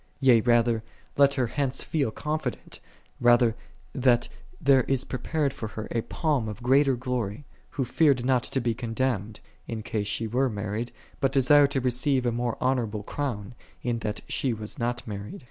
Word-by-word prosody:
Yea 125 -5 +5
rather, 120 -1 +3 0.3
let 140 0 +5
her 130 -3 +1
hence 135 +2 -2
feel 145 -7 0
confident, 150 +2 -4 0.4
rather, 120 -1 +4 0.4
that 125 -2 +3 0.3
there 135 -1 +5
is 135 -1 +1
prepared 140 +2 -2
for 115 -5 -5
her 110 0 -6
a 115 - 0
palm 140 -5 -1
of 105 +3 -8
greater 135 +1 +4
glory, 125 -1 -3 0.2
who 135 - -2
feared 135 -2 +3
not 130 -1 +3
to 135 - -1
be 120 -2 0
condemned, 115 -2 -2 0.3
in 110 -2 -4
case 105 -2 -2
she 115 +2 -1
were 125 +4 +1
married, 105 +2 -3 0.3
but 135 - +2
desired 140 +1 +5
to 140 -1 0
receive 130 +1 +1
a 120 - +2
more 120 0 -2
honorable 115 -5 0
crown, 120 -4 -4 0.3
in 120 -2 -1
that 105 -2 -3
she 130 -3 0
was 105 -1 -7
not 120 +1 -2
married. 100 -1 -6
125 Hz, 170 wpm, -27 LUFS, 115-135 Hz, 0.4 s, Yea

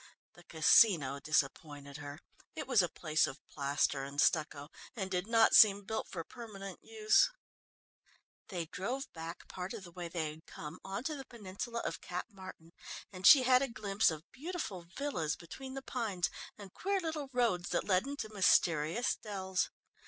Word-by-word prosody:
The 175 - -17
Casino 160 -4 +4
disappointed 145 -1 -2
her 145 -1 -8 0.4
it - - -4
was 250 -6 +5
a 175 - 0
place 155 -2 +1
of 135 - -7
plaster 140 0 0
and 140 +1 -6
stucco, 150 -3 +1 0.3
and 190 -4 -4
did 180 +1 -1
not 225 -1 +5
seem 205 -2 +7
built 220 +3 -3
for 170 -3 -5
permanent 195 -3 -9
use. 220 - +3 1.2
They 175 -3 -4
drove 240 - -4
back 165 +1 -8
part 180 +1 -6
of - - -8
the 175 - -11
way 175 0 -6
they 165 -3 -3
had 155 +1 -15
come, 150 +2 -8
on 195 +4 -4
to 310 +1 -2
the 270 -2 -8
peninsula 235 +1 -6
of - - -4
Cap 180 0 -4
Martin 185 -4 -11 0.4
and 185 +1 +2
she 275 -4 +10
had 255 0 +5
a 275 - +1
glimpse 205 -3 +1
of 155 -1 -5
beautiful 265 - -5
villas 225 - -1
between 260 +10 -9
the 270 - -6
pines 215 -10 -2 0.3
and 200 -3 -11
queer 395 +1 -1
little 315 -5 -4
roads 230 -9 +1
that - - 0
led 190 +5 +2
into 285 -5 -4
mysterious 170 +1 +3
dells. 190 -3 -2
190 Hz, 170 wpm, -33 LUFS, 160-235 Hz, 1.2 s, she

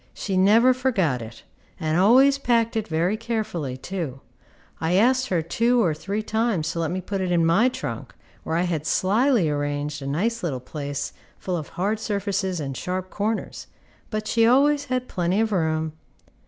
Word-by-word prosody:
She 195 - -3
never 220 +7 +5
forgot 200 - 0
it, 115 0 -10 0.4
and 155 -2 -1
always 260 +9 +5
packed 230 -4 +1
it 220 - -1
very 170 +5 0
carefully, 215 - -3
too. 155 -4 -5 0.6
I 165 +2 0
asked 255 +5 +3
her 175 -6 0
two 235 +8 +2
or 165 - +2
three 200 +7 -4
times 215 -8 0
to 170 - -4
let 165 -2 0
me 185 +1 -3
put 195 +1 -3
it 185 -1 -1
in 170 -2 +3
my 200 +10 +4
trunk, - - -6 0.3
where 160 - -3
I 170 - +2
had 160 -4 -2
slyly 220 - +2
arranged 145 0 -2
a 135 - -5
nice 220 +11 -1
little 145 -9 -2
place 145 +1 -5 0.2
full 185 - -3
of 155 -4 -4
hard 205 +4 0
surfaces 200 -4 -2
and 135 -3 -4
sharp 185 +5 -4
corners, 215 +2 -3 0.4
but 215 -1 -3
she 230 +1 +2
always 285 +3 +4
had 255 -1 -2
plenty 180 +3 0
of 225 -1 +1
room. 160 -4 0
185 Hz, 180 wpm, -24 LUFS, 160-225 Hz, 0.6 s, never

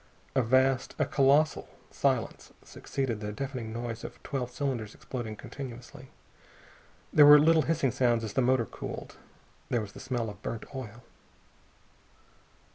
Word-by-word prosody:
A 130 - +3
vast, 130 +2 +2
a - - +2
colossal 140 +2 +3 0.2
silence - - -1
succeeded 130 -6 -3
the 105 0 -4
deafening 125 -1 -5
noise 115 0 -5
of - - -8
twelve 130 -3 -3
cylinders 125 -5 -3
exploding 120 -4 -6
continuously. 125 +1 -9 1.0
There 150 -1 +8
were 145 0 +11
little 160 +2 +5
hissing 155 -5 +1
sounds 120 -1 +2
as 110 - -5
the 130 - +2
motor 125 -1 +3
cooled. - - -8 0.5
There 120 - +1
was 105 -3 -6
the - - -10
smell 120 -4 -3
of - - -15
burnt 115 - -5
oil. 120 -3 -8
125 Hz, 140 wpm, -29 LUFS, 115-135 Hz, 1.0 s, were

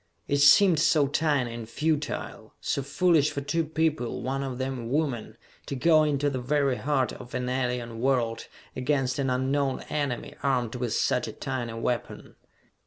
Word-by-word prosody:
It 145 - +1
seemed 165 +4 +6
so 155 -1 +4
tiny 140 -4 0
and 115 -1 -7
futile 155 +3 -3
so - - -1
foolish 150 +2 +2
for 140 - -4
two 165 +4 0
people, 155 -5 -1
one 135 +1 -2
of 130 -2 -4
them 130 0 -3
a 115 - -6
woman 135 -3 -2 0.3
to 140 - -3
go 155 +4 +4
into 145 -1 +1
the 130 -3 -2
very 135 0 +1
heart 135 -3 0
of 120 - -10
an 125 0 -2
alien 125 -2 -2
world, 120 -3 0 0.3
against 130 0 0
an 135 -1 0
unknown 135 +1 0
enemy, 145 -5 -2
armed 125 -5 0
with 125 -3 -2
such - - +1
a - - -6
tiny 125 -4 -4
weapon. 115 0 -3
135 Hz, 170 wpm, -27 LUFS, 125-150 Hz, 0.3 s, seemed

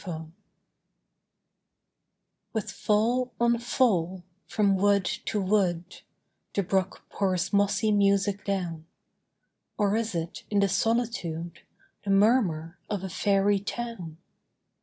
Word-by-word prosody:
GLAMOUR 160 -3 -6 2.2
With 220 -3 -2
fall 240 +4 +1
on 235 0 +3
fall, 190 -8 +1 0.2
from 200 -2 +2
wood 200 0 +3
to 210 - -2
wood, 185 -3 0 0.5
The 200 - +2
brook 190 +1 -1
pours 190 -2 -1
mossy 205 +2 +2
music 200 0 +2
down 175 -5 -3 0.9
Or 205 -1 +2
is 225 -3 -1
it, 165 0 -4
in 205 - +2
the 200 - +3
solitude, 195 -7 -1 0.4
The 200 - -5
murmur 195 -6 +2
of 200 -3 -2
a 190 - -4
Faery 200 +2 +2
town? 200 -6 -6
200 Hz, 110 wpm, -27 LUFS, 180-215 Hz, 2.2 s, on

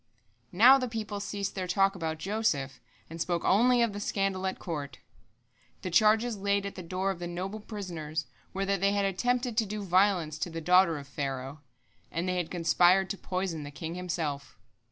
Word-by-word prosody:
Now 250 +9 +7
the 255 - -2
people 215 -2 -4
ceased 200 0 -3
their 185 -2 -3
talk 195 +2 +3
about 160 -4 -3
Joseph, 155 - -1 0.3
and 165 +1 -7
spoke 175 0 -1
only 240 +4 +4
of 230 -3 0
the 205 - -5
scandal 195 -2 -1
at 190 - -3
court. 145 -5 -5 0.9
The 185 - -3
charges 220 +3 +3
laid 200 0 +1
at 200 - -4
the 185 - -8
door 185 +3 -2
of 185 - -7
the 175 - -4
noble 185 +5 -4
prisoners 170 -8 -5 0.3
were 195 +1 -2
that 195 -1 0
they 200 0 +3
had 200 -1 +1
attempted 245 +4 0
to 225 - +3
do 210 +1 -4
violence 180 -4 +2
to 175 - -2
the 165 0 -5
daughter 180 0 +4
of 140 -1 -9
Pharaoh, 135 0 -4 0.5
and 170 +3 -2
they 180 0 0
had 175 -2 -2
conspired 180 +2 +3
to 200 - -4
poison 185 -4 -3
the 145 - -7
king 160 +3 -6
himself. 160 -6 -4
185 Hz, 195 wpm, -29 LUFS, 165-200 Hz, 0.9 s, Now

